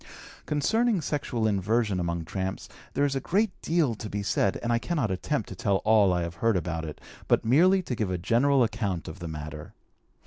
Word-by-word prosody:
Concerning 220 - +2
sexual 140 -7 -2
inversion 105 0 +1
among 85 -1 -2
tramps, 95 +2 -4 0.3
there 140 - +3
is 140 -1 -1
a - - +1
great 200 - +1
deal 160 -7 +1
to 110 0 -7
be 100 0 -3
said, 100 0 +1
and 120 0 +1
I 115 - +2
cannot 145 - -1
attempt 110 +6 -2
to 95 - -7
tell 100 +2 +1
all 105 -3 +5
I 90 -1 0
have 85 0 -6
heard 115 -4 +3
about 85 -1 -3
it, 75 - -7 0.3
but - - +2
merely 180 +10 +4
to 130 - -4
give 110 -5 -1
a 90 - -1
general 125 +9 +3
account 105 -6 -2
of 85 +4 -8
the 85 - -6
matter. 75 -1 -7
110 Hz, 205 wpm, -27 LUFS, 90-140 Hz, 0.3 s, all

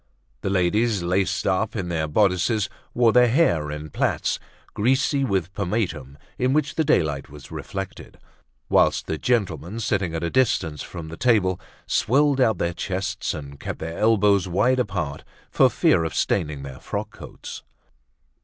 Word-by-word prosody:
The - - -2
ladies, 100 +2 +1
laced 95 +3 0
up 100 +4 0
in 95 -5 -2
their 80 -2 -1
bodices, 100 +5 +2 0.3
wore 120 -2 +4
their 125 0 +6
hair 120 - +2
in 75 0 -6
plaits - - 0 0.3
greasy 135 +5 +2
with 95 -6 -1
pomatum 85 - -2 0.2
in 130 +1 +2
which 150 -1 +1
the 160 - +1
daylight 80 - +1
was 70 0 -12
reflected; 95 0 -7 0.5
whilst - - +3
the 80 - -3
gentlemen, 100 - -1
sitting 95 -6 -1
at 80 - -3
a 85 - -1
distance 90 - +1
from 80 -2 -7
the 80 - -8
table, 105 -7 +2 0.2
swelled 140 +2 +2
out 110 -6 +3
their 85 +1 -1
chests 95 +1 -3
and 70 -2 -9
kept - - -5
their 80 +1 -6
elbows 105 -3 +3
wide 120 +9 +2
apart 90 - -2 0.3
for - - +5
fear 80 - +3
of 80 - -3
staining 75 -7 0
their 65 -2 -8
frock - - -4
coats. - - -9
95 Hz, 155 wpm, -24 LUFS, 80-115 Hz, 0.5 s, their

